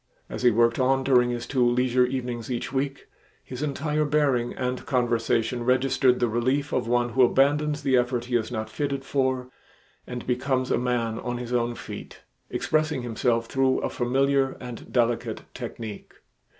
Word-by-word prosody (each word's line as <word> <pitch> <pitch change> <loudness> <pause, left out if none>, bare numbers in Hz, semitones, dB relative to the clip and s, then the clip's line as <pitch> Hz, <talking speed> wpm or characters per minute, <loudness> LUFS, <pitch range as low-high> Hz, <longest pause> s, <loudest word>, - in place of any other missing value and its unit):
As - - -5
he 125 - +6
worked 115 +1 +2
on 135 +1 +2
during 125 -2 +4
his 120 -1 -3
two 130 -3 +1
leisure 125 +1 +3
evenings 125 -3 -4
each 125 +1 -3
week, 135 +1 -2 0.4
his 125 +1 -7
entire 150 +1 -1
bearing 145 -5 +1
and 125 0 -2
conversation 120 -1 +1
registered 130 0 +3
the 120 - +2
relief 130 +6 0
of 125 -2 0
one 120 0 +2
who 130 +2 +1
abandons 145 +4 +3
the 130 -2 +3
effort 120 -1 0
he 125 0 -2
is 115 0 0
not 110 -2 -3
fitted 140 +3 -3
for 130 -2 -1 0.6
and 125 -1 -6
becomes 130 +1 0
a - - +2
man 120 -2 -1
on 120 -1 -3
his 120 0 -5
own 120 -1 0
feet, - - -9 0.3
expressing 155 -4 0
himself 115 0 0
through 130 +2 +1
a - - -2
familiar 135 +2 +1
and 125 -2 -9
delicate 120 -1 0
technique. 110 -3 -7
125 Hz, 165 wpm, -25 LUFS, 120-135 Hz, 0.6 s, he